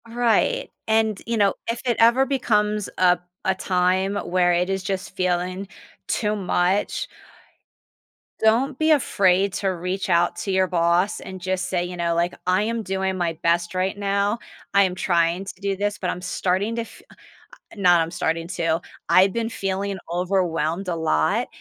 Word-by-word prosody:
Right, 245 - +1 0.2
and, 220 -2 +1
you 230 0 0
know, 200 -2 +3 0.2
if 230 0 -1
it 240 -2 +2
ever 235 +4 +5
becomes 210 -6 0
a 180 -1 +4 0.2
a 190 - +1
time 185 +2 +1
where 175 -2 +1
it 180 +2 +1
is 195 -1 -2
just 190 -1 -4
feeling 185 +1 -1 0.4
too 210 -1 0
much 190 0 0 1.3
don't 245 +5 +2
be 315 0 +2
afraid 200 - +3
to 195 - -2
reach 185 +2 -3
out 175 0 +3
to 195 - -4
your 190 0 +3
boss 175 +2 +1
and 190 0 -8
just 185 0 -2
say, 175 -2 0
you 180 0 -6
know, 170 -1 -1
like, 170 +1 0
"I 185 +2 +3
am 230 +1 -2
doing 190 -2 -2
my 175 -2 -1
best 170 +1 +1
right 185 +2 0
now. 200 +2 0 0.3
I 200 - +6
am 185 -2 0
trying 175 0 +1
to 195 - -6
do 200 0 -1
this, 205 +1 -2
but 180 - -2
I'm 180 - -4
starting 185 +4 -1
to - - 0
f 230 - -11 0.7
not 180 -4 +4
I'm 165 0 -2
starting 165 0 -2
to 165 -2 0 0.3
I've 190 +1 +5
been 230 -1 -1
feeling 195 -2 -3
overwhelmed 175 -1 0
a 175 - -1
lot, 80 - +1
190 Hz, 170 wpm, -23 LUFS, 180-210 Hz, 1.3 s, I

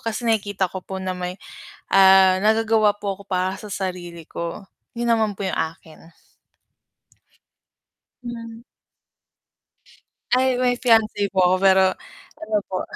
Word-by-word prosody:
kasi 230 +1 -4
nakikita 205 -3 0
ko 190 - -6
po 190 - -6
na 185 0 -2
may, 180 0 -5 0.6
ah, 190 -1 +6
nagagawa 220 -1 +3
po 200 -2 -4
ako - - -12
para 185 0 -1
sa 210 - -10
sarili 175 -4 -6
ko. 170 +4 -6 0.3
'Yun 235 0 -2
naman 220 -2 +1
po - - -7
'yung - - -3
akin. 160 0 -6 2.1
Ilan 230 -1 -8 1.7
Ay, 255 0 +2
may 250 0 +2
fiance 220 -4 +2
po - - -9
ako, 180 +1 +4
pero 190 -1 +5 0.6
ano 215 0 -1
po. 185 - -2
200 Hz, 130 wpm, -22 LUFS, 185-225 Hz, 2.1 s, ah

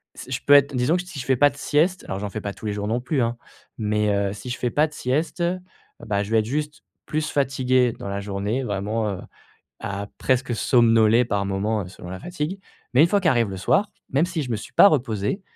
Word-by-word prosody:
c'est 130 - -10
je 130 - -2
peux 145 - +6
être, 140 -1 +5
disons 125 +6 +2
que - - -2
t 180 - -14
si 170 -6 -8
je 125 - -5
fais 130 0 +3
pas 145 +2 +6
de 140 - -14
sieste, 165 +6 +1
alors 95 - -3
j'en 105 0 -4
fais 110 - -5
pas 100 -1 -4
tous 95 +3 -12
les 105 - -1
jours 105 0 -3
non 115 +3 0
plus, 130 +2 0
hein. 120 0 -1 0.4
Mais, 105 -1 0
heu, 100 -1 0
si 105 +4 -8
je 125 - -3
fais 125 - -1
pas 150 +5 +2
de 150 - -16
sieste, 150 +8 -2
heu, 175 +2 0 0.5
bah, 100 -1 0
je 105 - -8
vais 115 - +4
être 110 - -1
juste 150 +5 -3 0.2
plus 155 0 -2
fatigué 130 -3 +2
dans - - -6
la 100 0 -3
journée, 100 +5 -2
vraiment, 105 0 -2
heu, 95 - -5 0.6
à 100 0 -4
presque 130 -2 0
somnoler 115 -1 +4
par 100 -4 -1
moments, 100 +2 -1
heu, 90 - -9
selon 90 -1 -11
la 95 +1 -6
fatigue. 175 +2 -4 0.4
Mais 130 - +7
une - - +5
fois 200 +3 +2
qu'arrive 120 - +2
le 95 - -5
soir, 190 - +1 0.2
même 140 +5 +2
si 175 -3 -3
je 130 - -5
me 115 - +1
suis 105 - -9
pas 200 - +8
reposé, 120 - 0
120 Hz, 255 wpm, -23 LUFS, 105-145 Hz, 0.6 s, pas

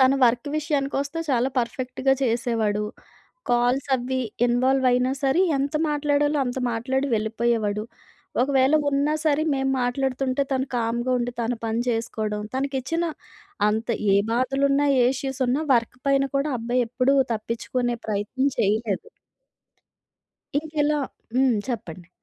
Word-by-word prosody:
తను 260 +1 +5
వర్క్ 240 +4 +2
విషయానికొస్తే 285 0 -1
చాలా 250 0 +2
పర్ఫెక్ట్‌గా 255 +2 0
చేసేవాడు. 230 -4 0 0.7
కాల్స్ 245 +2 +2
అవి 260 +1 -2 0.3
ఇన్వాల్వ్ 255 +2 +2
అయినా 250 +1 +2
సరే 270 +6 +3 0.2
ఎంత 280 +2 -2 0.2
మాట్లాడాలో 290 0 +1
అంత 245 +1 -3
మాట్లాడి 265 +4 -1
వెళ్ళిపోయేవాడు. 220 -1 0 0.6
ఒకవేళ 270 +1 +3 0.2
ఉన్నా 285 +2 +1
సరే 305 -1 +2
మేము 270 0 0
మాట్లాడుతుంటే 260 +1 0
తను 265 0 0
కామ్‌గా 235 +2 -1
ఉండి 245 0 -2
తన 235 +1 0
పని 225 +1 0
చేసుకోవడం. 220 -2 -2
తనకిచ్చిన 275 +5 -1 0.6
అంత 220 +3 -1 0.3
ఏ - - +6 0.2
బాధలున్నా, 275 +3 +2 0.2
ఏ - - +5
ఇష్యూస్ 270 0 -4
ఉన్నా, 270 +5 +1
వర్క్ 235 +1 0
పైన 275 0 +3
కూడా 280 +2 0
అబ్బాయి 240 +2 0
ఎప్పుడూ 255 +3 +2 0.2
తప్పిచ్చుకునే 235 +2 -2
ప్రయత్నం 215 +6 0
చేయలేదు. 210 0 0 1.5
ఇంకిలా 300 -1 0 0.4
హ్మ్. 260 -1 +4
చెప్పండి. 185 -8 -5
255 Hz, 120 wpm, -24 LUFS, 235-275 Hz, 1.5 s, ఏ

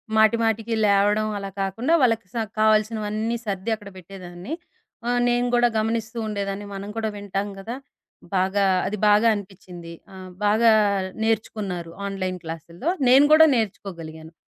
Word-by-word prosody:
మాటి, 220 +1 +5
మాటికి 225 +1 0
లేవడం 205 +2 +3
అలా 195 -1 -5
కాకుండా, 225 +11 -1
వాళ్ళకి 225 -5 +2
స - - -16 0.2
కావాల్సినవన్నీ 215 +1 +1
సర్ది 200 +2 -3
అక్కడ 205 -2 -12
పెట్టేదాన్ని. 180 - -9 0.6
ఆహ్, 245 0 +2
నేను 245 0 +1
గూడా 240 0 +4
గమనిస్తూ 225 +1 -2
ఉండేదాన్ని. 200 -1 -4
మనం 195 +1 -6
కూడా 220 -1 -1
వింటాం 200 0 -3
కదా! 225 +5 -6 0.6
బాగా 190 +2 +2 0.2
అది 210 - -3
బాగా 210 +2 +5
అనిపిచ్చింది. 180 -4 -9 0.2
ఆహ్, 185 -1 -10 0.2
బాగా 220 +2 +5 0.5
నేర్చుకున్నారు 200 -6 -2 0.2
ఆన్‌లైన్ 185 -2 -3
క్లాసుల్లో. 165 - -5 0.2
నేను 270 +3 +7
కూడా 320 +1 +8
నేర్చుకోగలిగాను 165 -7 -5
205 Hz, 135 wpm, -23 LUFS, 190-225 Hz, 0.6 s, కూడా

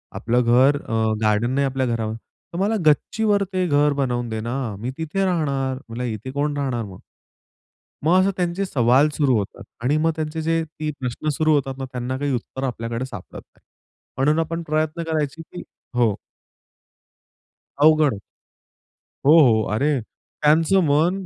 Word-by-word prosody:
आपलं 120 +2 +1
घर 130 +4 +4
अ, - - -7 0.3
गार्डन 110 +3 +2
नाही 140 +1 +1
आपल्या 135 0 -1
घरावर." 115 -3 -2
"तर 115 +8 -14
मला 205 +3 +1
गच्चीवर 205 +7 +2
ते 185 -1 +1
घर 145 -1 +3
बनवून 125 -4 -1
दे 110 0 -3
ना. 120 +3 -3 0.2
मी 120 +4 -4
तिथे 165 +5 -1
राहणार". 140 -7 -1
म्हणलं, 115 +2 -5
"इथे 115 +2 -5
कोण 145 +1 -1
राहणार 130 -5 -1
मग?" 95 -2 -11 1.1
मग 175 +4 +5
असं 190 +1 +3
त्यांचे 180 +2 -1
सवाल 130 -1 +3
सुरू 135 -5 +3
होतात 100 - -6 0.2
आणि 140 +4 +2
मग 160 +1 +2
त्यांचे 155 0 -3
जे 165 +1 +1
ते 155 -1 -5
प्रश्न 125 +4 -4
सुरू 155 0 +2
होतात 135 -2 -1
ना, 135 - -4
त्यांना 125 +1 -3
काही 145 0 -1
उत्तर 130 +2 -5
आपल्याकडे 115 -1 -3
सापडत 105 -8 -9
नाही. - - -34 0.5
म्हणून 150 +4 +2
आपण 165 +1 -3
प्रयत्न 155 +2 -1
करायची 160 -1 -2
की 175 - -10 0.3
हो. 115 -5 +2 1.7
अवघड 155 -1 +5
आहे. 100 - -7 1.1
हो, 145 - +6
हो. 110 -6 +4
अरे! 140 +5 +1 0.4
त्यांचं 160 +5 +4
मन 170 +7 +2
140 Hz, 160 wpm, -22 LUFS, 125-160 Hz, 1.7 s, हो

